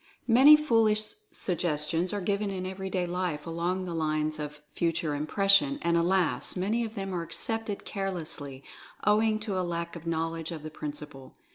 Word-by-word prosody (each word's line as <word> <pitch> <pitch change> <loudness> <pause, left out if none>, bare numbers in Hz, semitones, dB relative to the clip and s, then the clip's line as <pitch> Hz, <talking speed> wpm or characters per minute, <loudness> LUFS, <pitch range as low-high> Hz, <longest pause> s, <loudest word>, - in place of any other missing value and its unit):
Many 265 +6 +8
foolish 225 -7 +2 0.2
suggestions 170 0 0
are 205 - -2
given 200 +2 0
in 185 -1 -4
everyday 190 -1 -2
life 175 -4 -2
along 175 +3 -2
the 175 - -4
lines 155 -1 -1
of 150 0 -6
Future 165 -2 0
Impression, 195 - +3
and 170 0 +2
alas! 170 -6 +2
many 210 +6 0
of 225 0 -6
them 195 -2 -4
are 175 - -1
accepted 215 +5 -2
carelessly, 165 -9 -4 0.4
owing 215 +1 +3
to 205 -4 -2
a - - +1
lack 170 -1 -3
of 170 0 -9
knowledge 165 0 -2
of 160 -3 -6
the 155 - -6
principle. 145 -3 -8
180 Hz, 160 wpm, -28 LUFS, 160-200 Hz, 0.4 s, Many